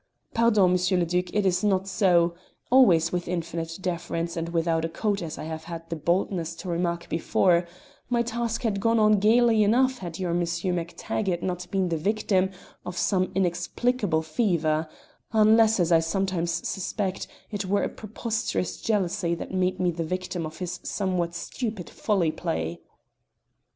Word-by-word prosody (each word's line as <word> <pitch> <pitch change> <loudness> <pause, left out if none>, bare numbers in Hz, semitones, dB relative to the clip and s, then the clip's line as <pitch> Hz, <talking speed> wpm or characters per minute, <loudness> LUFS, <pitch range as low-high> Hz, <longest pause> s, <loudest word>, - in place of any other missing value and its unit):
"Pardon, 215 -6 +4
M. 180 +1 +2
le 175 - +2
Duc, 180 +2 0
it 210 -1 +1
is 185 +2 +2
not 195 -2 +2
so, 180 -4 +3 0.4
always 175 -11 +5
with 175 -1 -2
infinite 165 -1 -3
deference, 170 -2 -3
and 165 0 -3
without 165 -1 +1
a 165 - -1
coat 205 +3 -1
as 160 -3 -5
I - - -6
have 160 0 -6
had 165 -1 -7
the - - 0
boldness 170 +1 -1
to 180 - -7
remark 170 0 -1
before: 170 +1 +2 0.4
my 240 -1 +2
task 235 0 -2
had 210 -4 0
gone 230 +3 +2
on 215 -1 +5
gaily 225 +1 +4
enough 255 +5 +3
had 170 -3 -6
your 180 -3 -2
Monsieur 170 +1 -1
MacTaggart 175 +2 -2
not 180 -1 -3
been 190 -2 0
the 165 - 0
victim 190 +1 +1 0.3
of 180 0 -6
some 185 0 +1
inexplicable 180 +1 0
fever 160 -3 0 0.4
unless 220 0 +5
as 175 -1 +2
I 165 - +6
sometimes 170 0 -1
suspect 195 0 -3 0.2
it 205 -2 -3
were 200 +2 +1
a - - +1
preposterous 220 -3 -3
jealousy 180 -5 0
that 170 - -7
made 185 0 0
me 180 -1 +2
the 165 0 -3
victim 180 0 -3
of 155 +1 -11
his 180 -2 -4
somewhat 180 -4 -2
stupid 215 -1 -5
folly 190 -7 +1
play." 80 - -3
180 Hz, 165 wpm, -26 LUFS, 170-205 Hz, 0.4 s, I